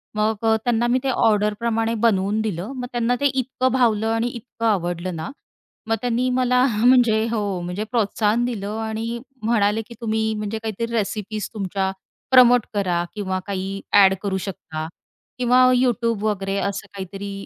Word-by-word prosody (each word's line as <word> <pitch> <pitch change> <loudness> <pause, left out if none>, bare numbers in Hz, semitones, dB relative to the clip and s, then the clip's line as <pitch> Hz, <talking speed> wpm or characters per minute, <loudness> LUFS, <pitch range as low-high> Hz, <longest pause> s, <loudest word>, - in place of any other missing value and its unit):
मग 215 +1 +1
अ, 220 - +4
त्यांना 240 -1 +1
मी 250 +2 +2
ते 270 - 0
ऑर्डर 210 -4 +2
प्रमाणे 225 -1 0
बनवून 205 -1 +2
दिलं. 205 +1 -3
मग 250 -1 -4
त्यांना 240 0 +1
ते - - +2
इतकं 260 0 0
भावलं 225 -4 +2
आणि 225 +1 0
इतकं 235 -1 -6
आवडलं 175 -3 -1
ना 160 0 -5 0.6
मग 225 - +3
त्यांनी 245 +1 0
मला 250 0 +3 0.2
म्हणजे 240 -4 +5
हो 230 - 0 0.2
म्हणजे 180 +4 -4
प्रोत्साहन 220 0 +1
दिलं 215 -3 -4
आणि 225 +2 -3 0.2
म्हणाले 215 -1 +2
की 235 - -10
"तुम्ही 220 -1 0
म्हणजे 210 +1 -3
काहीतरी 220 0 -3
रेसिपीज 210 -1 -2
तुमच्या 195 -2 -2 0.4
प्रमोट 245 -2 +7
करा 180 -4 0
किंवा 190 -3 -2
काही 195 0 -4 0.2
एड 190 0 +6
करू 195 -2 -1
शकता 160 -4 -6 0.5
किंवा 250 +1 +4
YouTube 235 -3 +1
वगैरे." 195 -2 -1
असं 200 -1 -3
काहीतरी 195 +1 -6
220 Hz, 160 wpm, -22 LUFS, 200-235 Hz, 0.6 s, प्रमोट